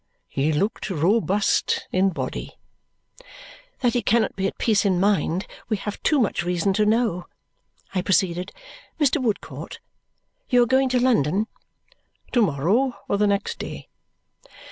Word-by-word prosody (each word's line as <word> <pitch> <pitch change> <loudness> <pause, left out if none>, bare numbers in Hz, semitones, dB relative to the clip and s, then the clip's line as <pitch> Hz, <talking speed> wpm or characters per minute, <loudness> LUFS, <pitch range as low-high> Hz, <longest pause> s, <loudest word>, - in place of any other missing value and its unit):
He 140 +3 0
looked 200 +9 -1
robust 195 +4 +1
in 190 +1 +3
body. 175 - -5 1.2
"That 245 -2 +2
he 245 - +1
cannot 230 -3 +1
be 195 0 0
at - - -6
peace 215 -3 +2
in 190 -4 +2
mind, 190 -2 +1 0.2
we 215 - +1
have 205 +1 -6
too 300 - +2
much 230 - +1
reason 180 +2 0
to 210 +2 +2
know," 215 -6 +1 0.7
I 185 - +1
proceeded. 180 -1 0 0.5
"Mr. 295 0 +2
Woodcourt, 220 -5 -4 0.7
you 245 -2 +5
are - - +2
going 260 +2 +2
to 250 0 +2
London?" 215 - +2 0.9
"To 245 - +3
morrow 205 - +1
or 200 - 0
the 210 - +3
next 200 0 -1
day." - - -7
205 Hz, 145 wpm, -23 LUFS, 185-235 Hz, 1.2 s, you